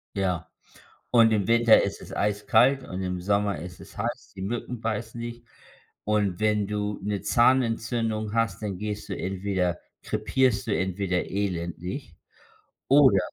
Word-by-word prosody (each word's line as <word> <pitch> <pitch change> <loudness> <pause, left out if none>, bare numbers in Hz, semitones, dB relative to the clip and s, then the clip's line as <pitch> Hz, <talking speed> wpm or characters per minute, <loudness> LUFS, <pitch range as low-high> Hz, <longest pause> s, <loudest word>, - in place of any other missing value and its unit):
Ja. 90 -4 -1 0.6
Und 115 -2 +6
im 100 -3 +1
Winter 115 -1 +6
isses - - -5
eiskalt 110 +6 +3
und 95 -5 -5
im 90 -1 -3
Sommer 100 0 +1
isses 90 +3 -10
heiß, - - -4
die 95 - -9
Mücken 120 +3 -4
beißen 115 +1 -3
dich. 120 0 -6 0.6
Und 105 -4 0
wenn 105 -1 +2
du 105 0 -2
'ne 100 0 -2
Zahnentzündung 115 -3 +1
hast, 115 -1 0
dann 100 -4 -3
gehst 105 +1 -4
du 100 - -2
entweder 95 -2 -1 0.2
krepierst 125 -7 +1
du 105 - 0
entweder 95 -1 -1
elendig, 90 - -4 0.7
oder 135 -8 +6
105 Hz, 135 wpm, -26 LUFS, 95-115 Hz, 0.7 s, Und